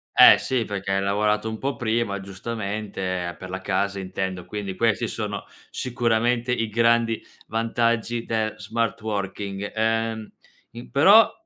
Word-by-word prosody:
Eh - - +9
sì, 125 -3 0
perché 100 -1 -3
hai 95 - +1
lavorato 105 +2 +1
un 110 0 -4
po' 140 +1 -2
prima 115 -4 -1
giustamente 95 -3 -4
per 95 - -9
la 95 0 -4
casa 100 +1 -1
intendo, 95 -1 -4
quindi 100 -3 -5
questi 115 0 +1
sono - - -4 0.2
sicuramente 120 0 0
i 115 -3 0
grandi 115 0 +2 0.2
vantaggi 115 +1 0
del 110 -1 -1
smart 115 0 -2
working; 100 -1 -4
ehm, 110 0 0 0.4
in 120 +1 -10
però 200 +11 +7
110 Hz, 135 wpm, -24 LUFS, 100-115 Hz, 0.4 s, Eh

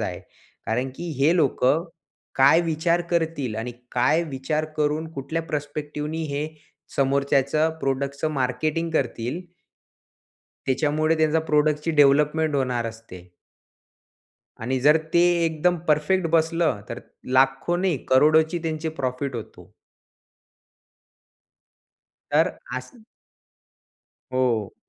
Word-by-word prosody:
आहे. - - -4 0.5
कारण 125 +4 -1
की 175 - -6
हे 150 +5 +4
लोकं 150 0 +2 0.5
काय 140 +5 +6
विचार 165 +1 +1
करतील 160 -8 -1
आणि 120 +2 -4 0.2
काय 145 +7 +3
विचार 150 +2 -2
करून 150 +1 0
कुठल्या 160 +3 -3
प्रस्पेकटीव 150 -1 -4 0.2
हे 145 +2 -2 0.5
समोरच्याचं 140 +3 +2
प्रॉडक्टच 140 +2 -2
मार्केटिंग 155 +3 -1
करतील. 125 0 -2 1.3
त्याच्यामुळे 155 +4 +1
त्यांच्या 160 0 +2
प्रॉडक्टची 150 0 +1
डेव्हलपमेंट 150 +1 +3
होणार 125 -4 0
असते. 110 -6 -10 1.3
आणि 130 +3 -1
जर 150 +4 +6 0.2
ते 170 - +5 0.3
एकदम 165 +2 +1
परफेक्ट 155 +5 +2
बसलं, 165 -6 +1
तर - - -6 0.4
लाखोे 135 +6 +2
नाही, 185 -4 +1
करोडोची 155 +5 +4
त्यांची 160 -1 -2
प्रॉफिट 130 +1 -2
होतो. 110 - -10 2.6
तर - - +2 0.2
अस 130 - -8 1.3
हो. 120 -5 0
150 Hz, 100 wpm, -24 LUFS, 130-160 Hz, 2.6 s, काय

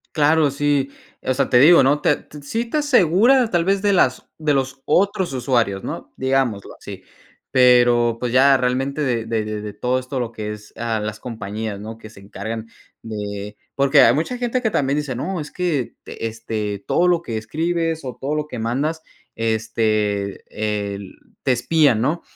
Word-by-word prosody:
Claro, 150 -1 +3
sí, 140 -1 0 0.3
o 130 - 0
sea, 135 0 0
te 125 - +5
digo, 155 0 +7
no 145 +3 +2
te - - +3
t 150 - -13
sí 225 +12 -2
te 305 - 0
asegura 245 - +4
tal 175 -4 +1
vez 195 +2 +1
de 205 -1 +2
las 130 -8 +2
de 155 -2 +1
los 135 0 -2
otros 190 0 +1
usuarios, 120 -6 0
¿no?, - - -6
digámoslo, 130 -6 -1
así. - - -10 0.5
Pero, 120 -2 +4
pues, 120 -1 -2
ya 135 +1 +6
realmente 130 +3 -1
de 120 -5 0
de 110 -2 -1
de 105 -1 -4
de 105 -1 -6
todo 125 +4 0
esto 130 +1 -5
lo 120 -2 -3
que 105 -1 -5
es, 105 0 -10
ah, 115 -2 -2
las 105 0 -5
compañías, 110 -3 -5
¿no?, 110 +2 -8
que 110 -1 -12
se 105 - -15
encargan 110 +3 -6 0.3
de 105 -1 -6 0.2
porque 140 +1 +5
hay 115 - +6
mucha 165 - -1
gente 245 +1 -1
que 220 - +1
también 140 -7 0
dice, 145 -4 -3
no, 180 +7 -3
es 150 -1 -6
que 160 -7 -2
te 115 - -5
este, 110 -3 -4
todo 175 - +2
lo 175 -1 +3
que 115 -9 -4
escribes 165 +7 -2
o 130 -2 -6
todo 145 +3 -2
lo 150 0 -2
que 125 -6 -7
mandas, 140 +8 -1 0.3
este, 110 -3 -1 0.5
el 100 -1 -10 0.3
te 130 - +3
espían, 135 -1 +3
¿no? 155 +7 0
130 Hz, 190 wpm, -21 LUFS, 110-155 Hz, 0.5 s, digo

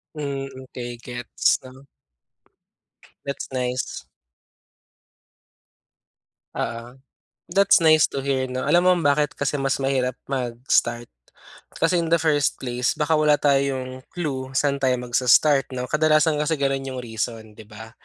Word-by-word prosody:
Hmm, 140 -2 -4 0.2
okey 120 -2 -7
gets 120 -1 0
'no. 130 +1 -14 1.4
That's 140 0 -5
nice. 125 -1 -3 2.5
Oo. 115 +2 -5 0.6
That's 195 -1 +4
nice 155 -1 +6
to 135 - -2
hear 135 -1 0
'no. 130 0 -4
Alam 175 +5 +3
mo 185 - +6
bakit 145 0 +2
kasi 145 +1 -2
mas 135 0 -1
mahirap 130 -2 0 0.2
mag-start? 120 -2 -1 0.6
Kasi 180 - +1
in 170 - 0
the 170 - +5
first 145 -4 +1
place 125 -1 -1
baka 155 +1 +1
wala 150 -1 +4
tayong 135 -2 0
clue 135 -6 -4
saan 140 0 +1
tayo 130 -2 +2
magsa-start 130 +3 +3
no. 125 0 -4
Kadalasan 155 0 +3
kasi 150 +2 0
ganun 135 -2 -1
yung 130 -1 -5
reason 115 -1 -4 0.2
di 110 - -12
ba. 110 +1 -11
135 Hz, 130 wpm, -23 LUFS, 125-150 Hz, 2.5 s, nice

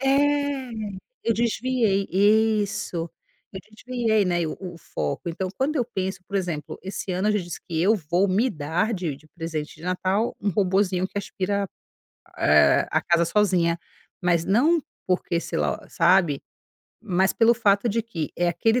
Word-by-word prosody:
É, 280 -1 +1 0.5
eu 230 - +1
desviei 230 -3 +1
isso, 205 -3 +2 0.4
eu 190 - -6
desviei, 225 -2 0
né, 175 -2 +1
o 155 - -4
o 180 -3 -8
foco. 75 - -4
Então, 185 +3 -3
quando 290 +4 0
eu 250 - +2
penso 190 -4 -4
por 200 - -10
exemplo, 170 -6 -3
esse 190 0 -4
ano 185 +4 0
eu - - +3
já 210 - +2
disse, 175 -1 -7
que 165 - -2
eu 205 +5 +5
vou 175 0 +1
me 200 +7 +2
dar 160 - -1
de 175 -6 -3
de 155 +3 -19
presente 160 -1 -5
de 155 - -16
Natal, 185 +5 0
um 205 - -1
robozinho 190 -1 +1
que 200 - -5
aspira, 200 0 -2 0.7
eh, - - +5
a - - +2
casa 170 -1 +2
sozinha, 175 -3 +2 0.4
mas 175 -2 +2
não 290 - +3 0.2
porque, 180 -2 0
sei - - -3
lá 75 -3 0
sabe, 175 -7 +3 0.6
mas 190 -3 +1
pelo 230 +1 +4
fato 210 -1 +2
de 230 +2 +1
que, 190 -10 -5
é 175 0 +2
aquele 225 +8 +2
195 Hz, 165 wpm, -24 LUFS, 175-220 Hz, 0.7 s, eu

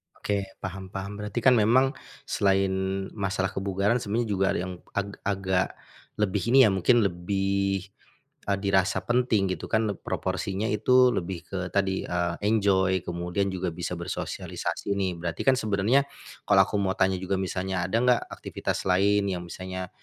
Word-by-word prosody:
Oke, 100 -1 -2 0.2
paham 95 0 -5
paham. 95 +1 -4
Berarti 105 +3 -3
kan 130 - +7
memang 130 +5 +4 0.4
selain 95 -1 +2 0.4
masalah 95 -2 -1
kebugaran, 100 +4 0
sebenarnya 115 +2 -1
juga 95 -1 +1
ada - - -1
yang 90 0 -5 0.2
ag 100 0 -1 0.2
agak 95 -2 +1 0.5
lebih 105 -1 0
ini 135 - +6
ya, - - +4
mungkin 110 +5 +4
lebih, 95 +1 0 0.6
eee, 100 -1 +1
dirasa 95 -1 +2
penting 120 -6 +2
gitu - - -4
kan 110 -1 +2
leb 100 - -3
proporsinya 100 +3 -2
itu 125 +5 +4
lebih 90 -5 -3
ke 95 - -4 0.2
tadi, 95 -1 0
eee, 85 -1 -1
enjoy, 95 -4 +2
kemudian 90 +3 -2
juga 90 -2 -3
bisa 90 +1 -4
bersosialisasi 90 +3 -4
nih. 95 -2 0
Berarti 85 -1 -3
kan 130 - +6
sebenernya, 110 +6 +2 0.4
kalau 100 -2 +6
aku - - -4
mau 95 -1 +1
tanya 95 -1 +1
juga 95 +1 -1
misalnya, 95 -1 -2
ada 110 - +1
enggak 125 -1 +3
aktivitas - - -4
lain 100 +2 +3
yang 90 -2 -2
misalnya 95 0 -6
95 Hz, 160 wpm, -26 LUFS, 95-105 Hz, 0.6 s, kan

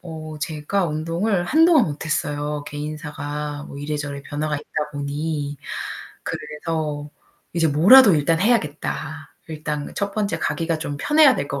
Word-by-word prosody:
어. 160 -2 -8
제가 160 +5 -1
운동을 170 +5 0
한동안 315 - +5
못 150 -1 -5
했어요, 145 -1 -2
개인사가 150 0 -5
뭐 - - -9
이래저래 145 -1 -4
변화가 150 +1 -2
있다 150 +1 -4
보니. 145 0 -3 0.7
그래서 150 -1 -4 0.4
이제 165 -1 +2
뭐라도 195 - +8
일단 160 +2 +2
해야겠다. 155 -6 -1
일단 150 -2 -4
첫 200 0 -1
번째 210 -2 -1
가기가 165 -1 -1
좀 145 -2 -4
편해야 295 - +5
될 140 - -3
것 140 - -3
155 Hz, 295 characters per minute, -22 LUFS, 145-170 Hz, 0.7 s, 뭐라도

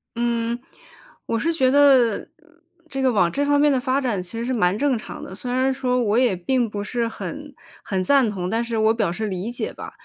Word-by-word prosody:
嗯， 235 0 -1 0.7
我 230 - -1
是 330 +8 0
觉 260 -5 +2
得 265 -5 +4 0.6
这 270 -2 -3
个 260 -1 +3
往 190 -6 +3
这 285 +10 0
方 290 0 +3
面 295 0 +4
的 265 - +2
发 260 +1 0
展 230 -8 -1
其 225 +6 -6
实 235 - -3
是 260 - -1
蛮 195 -4 +1
正 275 -1 +1
常 - - -9
的， 190 - -8
虽 245 +4 -5
然 260 +1 +1
说 250 -1 0
我 210 0 +1
也 245 -6 +3
并 240 +6 0
不 205 -1 -4
是 235 +2 -2
很 290 +5 -7 0.3
很 190 -2 -2
赞 270 +1 +3
同， 185 -3 -4
但 225 +2 0
是 235 -1 -3
我 220 0 +3
表 210 -7 0
示 215 +4 -3
理 195 +3 -4
解 240 - -4
吧。 - - -9
235 Hz, 245 characters per minute, -22 LUFS, 210-265 Hz, 0.7 s, 得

